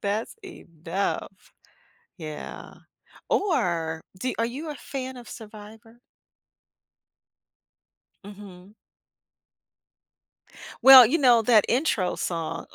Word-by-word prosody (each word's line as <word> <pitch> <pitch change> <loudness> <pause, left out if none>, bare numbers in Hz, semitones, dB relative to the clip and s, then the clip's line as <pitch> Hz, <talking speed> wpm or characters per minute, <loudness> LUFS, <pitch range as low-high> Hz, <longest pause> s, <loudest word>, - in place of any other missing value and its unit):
That's 210 +3 -3
enough. 190 - -6 0.7
Yeah. 155 -3 -9 0.6
Or 170 - -1 0.2
do 255 +6 -3
are 230 - +1
you 295 +6 -7
a - - -6
fan 260 -2 -7
of 245 -1 -12
Survivor? 220 +1 -13 2.3
Mhm. 200 -1 -13 2.1
Well, 260 -3 +10
you 280 - +1
know, 250 -6 +4
that 220 -2 +3
intro 235 - 0
song, 165 -2 -5
220 Hz, 85 wpm, -24 LUFS, 185-255 Hz, 2.3 s, Well